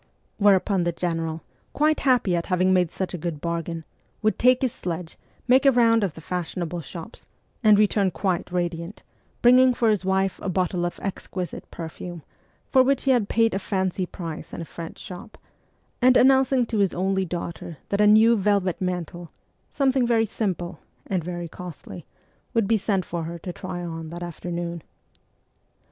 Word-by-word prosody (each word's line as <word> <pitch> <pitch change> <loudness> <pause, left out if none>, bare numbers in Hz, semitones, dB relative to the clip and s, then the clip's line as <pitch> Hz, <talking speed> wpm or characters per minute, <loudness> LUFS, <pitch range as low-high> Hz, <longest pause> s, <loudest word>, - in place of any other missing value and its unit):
Whereupon 195 -2 +4
the 175 - +1
general, 165 -2 -3 0.3
quite 305 +1 +2
happy 250 -9 +2
at 170 - -2
having 185 0 +2
made 180 -3 +2
such 190 -1 -4
a 180 - -4
good 160 -2 -4
bargain, 170 0 -3 0.4
would 215 - +1
take 255 +1 +4
his 255 - +1
sledge, 170 -1 -5 0.3
make 260 +2 +5
a 275 - +6
round 230 -3 +4
of 185 -6 -2
the 160 - -10
fashionable 175 0 -4
shops, 165 +2 -10 0.4
and 215 -2 +7
return 205 -2 +3
quite 185 -2 -2
radiant, 175 +1 -3 0.4
bringing 250 +1 +6
for 230 -2 +3
his 205 -3 0
wife 190 0 0
a - - -3
bottle 180 -1 0
of 175 - -8
exquisite 185 -2 -5
perfume, 170 0 -7 0.5
for 260 - +6
which 270 +1 +2
he 270 - +3
had 235 -6 +2
paid 225 0 +3
a 195 - 0
fancy 190 -2 -1
price 165 -4 -7
in - - -6
a - - -5
French 165 0 -8
shop, 205 +5 -10 0.6
and 255 +1 +6
announcing 265 -1 +4
to 220 -2 -2
his 195 -3 +2
only 190 +2 +1
daughter 170 -2 -5
that 200 +1 +1
a 210 - +6
new 220 +2 +6
velvet 200 -3 +1
mantle 175 -2 -4 0.2
' - - -44
something 265 -3 +3
very 225 -1 +3
simple 190 -5 -3
', - - -40
and 185 -3 0
very 175 0 -5
costly 160 - -9 0.5
would 225 -3 +2
be 225 - +3
sent 195 -3 0
for 170 -2 -4
her 170 +1 -5
to 175 +1 -7
try 180 -1 -6
on 165 -1 -6
that 175 +1 -6
afternoon. 170 0 -5
185 Hz, 180 wpm, -24 LUFS, 170-220 Hz, 0.6 s, and